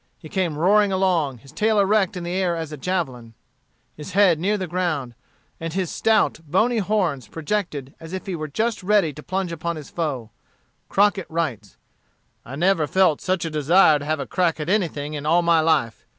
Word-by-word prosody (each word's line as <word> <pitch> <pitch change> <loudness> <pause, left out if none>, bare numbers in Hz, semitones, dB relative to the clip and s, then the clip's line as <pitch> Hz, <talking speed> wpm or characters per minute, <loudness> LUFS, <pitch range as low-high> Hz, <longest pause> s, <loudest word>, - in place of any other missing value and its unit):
He 155 - -12
came 175 -5 -1
roaring 200 +5 +4
along, 175 -8 +1
his 135 +4 -16
tail 215 0 +1
erect 200 -1 +2
in 175 - -5
the 175 - -4
air 185 -2 0
as 160 -2 -5
a - - -5
javelin, 130 -8 -3 0.6
his 150 +5 -9
head 185 -5 +4
near 205 +5 +1
the 190 - -3
ground, 165 -8 -2 0.5
and 165 -1 -5
his 185 -2 -2
stout, 220 -7 +2
bony 220 +9 +2
horns 180 - -1
projected 160 - -3
as 165 0 -10
if 190 0 -5
he 190 -3 -3
were 155 -2 -4
just 220 +10 -1
ready 190 -5 +2
to 150 - -10
plunge 185 +1 -3
upon 170 +1 -3
his 150 -3 -10
foe. 135 -10 -3 0.6
Crockett 200 -2 +2
writes: 130 - -3 0.7
"I 130 - -8
never 170 0 +2
felt 185 -5 +2
such 185 -2 -1
a 165 - -3
desire 155 +1 +4
to 145 - -7
have 155 0 -1
a 140 - -3
crack 170 0 0
at 150 +2 -4
anything 160 -7 -1
in 150 0 -4
all 170 +2 +4
my 170 -1 +4
life. 155 -8 +1
170 Hz, 195 wpm, -23 LUFS, 150-190 Hz, 0.7 s, roaring